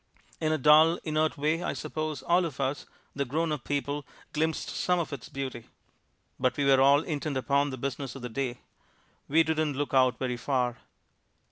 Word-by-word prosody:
In 155 -1 0
a 155 - +2
dull, 155 +4 +6
inert 155 0 0
way 155 +4 0
I - - -2
suppose 155 -3 -4
all 175 +2 +3
of 145 -5 -6
us, 135 +1 -2 0.3
the 140 - 0
grownup 150 +1 -1
people, 145 0 -2 0.3
glimpsed 160 +1 -1
some 180 0 +1
of 165 -3 -2
its 135 - -7
beauty. 135 -5 -5 0.7
But 125 -1 +1
we 145 - +1
were 135 -1 +5
all 140 +2 +6
intent 150 -3 -3
upon 140 +2 +1
the 130 - -5
business 135 0 -4
of 135 - -9
the 125 - -4
day 125 0 -3 0.7
we 160 +3 +4
didn't 155 -3 0
look 145 -1 -2
out 130 -3 +4
very 125 -2 -2
far 125 -1 -1
140 Hz, 180 wpm, -28 LUFS, 130-155 Hz, 0.7 s, dull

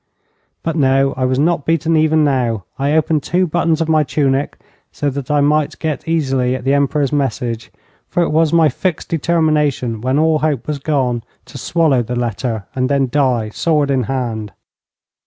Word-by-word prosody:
But, 165 -1 -2
no; 135 -2 +2
I 130 - -1
was 130 0 0
not 160 +1 +1
beaten 165 +1 +1
even 155 0 +3
now. 125 -7 0 0.2
I 140 +2 +1
opened 155 -1 +2
two 180 +6 +1
buttons 165 -1 0
of 165 - 0
my 155 -1 +3
tunic 140 -1 0 0.3
so 145 -1 -2
that 135 -1 -6
I 150 -1 +2
might 150 +1 +1
get 155 -1 -4
easily 135 -6 0
at 130 - -6
the 135 +2 +1
Emperor's 140 0 +1
message, 125 -5 -2 0.4
for 175 - +1
it - - -1
was 160 0 +2
my 165 -2 +5
fixed 165 +5 -2
determination 150 -8 0
when 130 +3 0
all 160 0 +3
hope 145 -5 -1
was 150 -2 -3
gone 130 -5 0 0.2
to 135 - -10
swallow 155 -4 +2
the 120 +1 -4
letter 115 -2 -3
and 130 -1 -1
then 140 -2 +1
die 125 -6 +1
sword 150 +4 0
in 130 -3 +1
hand. 115 -6 -3
140 Hz, 180 wpm, -17 LUFS, 130-155 Hz, 0.4 s, my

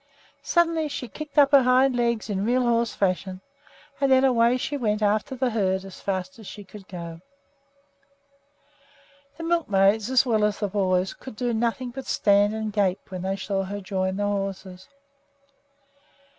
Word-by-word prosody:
Suddenly 330 -2 +1
she 275 -3 -5
kicked 305 +6 -9
up 280 -1 +6
her 280 -2 +7
hind 255 +1 +3
legs 235 -3 0
in 200 -2 -2
real 250 +3 +2
horse 235 -1 +1
fashion, 185 -1 -1 0.6
and 275 -1 +2
then 260 0 +5
away 245 -1 +3
she 280 +3 -3
went 215 -5 -1
after 210 +5 0
the 255 -1 0
herd 190 -3 0
as 195 - -11
fast 185 +1 -4
as 215 - -11
she 205 - -9
could 195 0 -13
go. 170 -2 -8 2.2
The 330 - -7
milkmaids, 215 - +2
as 260 0 +4
well 220 -4 +1
as 210 -1 +1
the 205 - -1
boys, 185 -2 0
could 260 - -11
do 240 +2 -1
nothing 235 +2 -1
but 265 +1 -8
stand 205 0 +3
and 220 -1 -4
gape 195 -2 -1
when 185 -1 -5
they 190 +1 -2
saw 195 -1 -2
her 200 +2 -5
join 190 -1 -2
the 205 - -1
horses. 195 -2 -4
210 Hz, 170 wpm, -25 LUFS, 195-250 Hz, 2.2 s, her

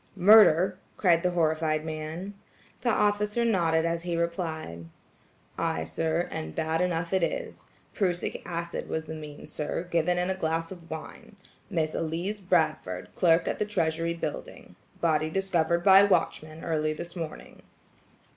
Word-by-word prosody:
"Murder!" 190 -2 +6 0.2
cried 170 -4 +4
the 180 - +1
horrified 160 -2 0
man. 160 +5 -5 0.5
The 245 - +1
officer 210 +1 +1
nodded 165 -7 +2
as 170 0 -1
he 175 0 -2
replied: 160 - -3 0.7
"Ay, 80 - 0
sir; 160 - -1
and 160 0 -5
bad 160 +1 0
enough 175 -1 -1
it 190 - +3
is. - - -3 0.3
Prussic 180 -4 -1
acid 170 0 -4
was 160 0 -2
the 160 - -6
means, 150 -2 -9
sir, 155 +3 -3
given 170 +1 +2
in 180 +1 0
a - - -1
glass 165 -1 -1
of 175 -3 -11
wine. 160 +6 -8 0.3
Miss 160 -5 0
Elise 170 +6 -2
Bradford, 155 - 0
clerk 165 -1 +3
at - - -2
the 210 - +1
Treasury 165 -4 0
Building. 170 - -6 0.3
Body 155 -2 +2
discovered 170 -2 0
by 195 -1 +8
watchman 160 -5 0
early 155 -2 0
this 170 +3 -8
morning." 165 -3 -7
170 Hz, 145 wpm, -28 LUFS, 160-185 Hz, 0.7 s, by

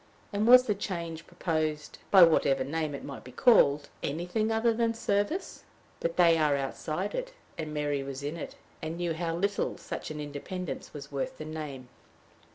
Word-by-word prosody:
and 205 +2 +1
was 250 +1 +9
the 215 - +1
change 170 -5 -5
proposed, 155 -3 -2
by 190 -3 +9
whatever 140 -5 +4
name 150 +1 -2
it - - -8
might 140 - -8
be 125 - -11
called, 145 - +5
anything 180 +9 -1
other 225 +1 +3
than 230 0 +1
service? 205 - -1 0.4
But 170 0 -2
they 170 -2 +6
are 150 -2 +3
outside 155 +7 -3
it, - - -4 0.2
and 155 -2 -5
Mary 145 -2 -1
was 135 0 -6
in 145 +3 -3
it, 170 - -7 0.3
and 160 +1 -4
knew 175 -1 -1
how 165 0 -2
little 200 +3 -1
such - - -6
an 155 -1 -6
independence 150 +5 -5
was 145 -1 -9
worth 140 -1 -3
the 155 - -7
name. 150 -5 -6
165 Hz, 175 wpm, -29 LUFS, 145-200 Hz, 0.4 s, was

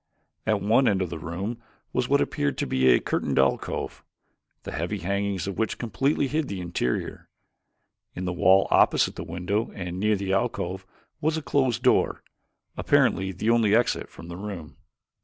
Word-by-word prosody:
At 105 -3 +1
one 115 +5 +4
end 95 -2 +2
of 90 - -5
the - - -5
room 95 +9 -5 0.3
was - - 0
what - - +4
appeared 70 - -1
to - - -1
be 65 0 +1
a - - +6
curtained - - -2
alcove, 65 0 0 0.6
the - - -6
heavy - - -2
hangings 100 +1 -2
of 100 -1 -5
which 110 - 0
completely 135 +5 0
hid 150 +1 -1
the 100 -5 -4
interior. 85 -8 -3 0.9
In 90 - -4
the 90 - -1
wall 95 +2 +4
opposite - - +4
the - - -5
window 95 +6 -2
and 90 -1 -5
near 105 +1 +2
the 95 -1 -2
alcove 95 -1 -2 0.3
was 155 +1 +1
a 160 - -4
closed 125 -2 +1
door, 125 - +2 0.5
apparently 95 0 +2
the 105 +5 0
only 110 -3 +4
exit 120 +1 +1
from 85 - -12
the 85 0 -7
room. 95 -6 -7
100 Hz, 175 wpm, -26 LUFS, 90-115 Hz, 0.9 s, a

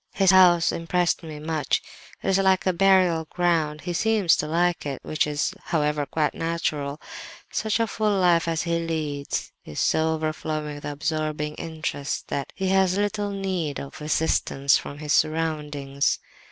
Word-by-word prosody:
His 195 -2 +5
house 175 -3 +6
impressed 175 +1 0
me 155 -3 -8
much; 155 -2 -1 0.4
it - - 0
is 195 0 +3
like 190 -1 +3
a 185 - +2
burial 185 -3 +4
ground, 160 -3 0
he 180 - -4
seems 210 -2 +3
to 150 - -2
like 175 +2 +1
it, 140 -2 -4
which 155 - 0
is, 150 +4 -1
however, 150 -3 0
quite 155 -2 0
natural. 155 -3 -2 0.5
Such 220 +1 0
a 230 - +3
full 210 -2 0
life 175 -2 +3
as 165 -1 0
he 170 -1 0
leads 155 -4 -3
is 75 - -7
so 160 0 +2
overflowing 155 -1 -3
with 145 - -9
absorbing 150 0 -2
interests 155 -3 -4
that 140 - -3
he 190 -1 -1
has 190 -1 +3
little 205 0 -1
need 185 -7 -2
of 140 +2 -9
assistance 150 -3 +2
from 145 - -3
his 150 0 -1
surroundings. 150 -3 0
160 Hz, 160 wpm, -25 LUFS, 150-180 Hz, 0.5 s, house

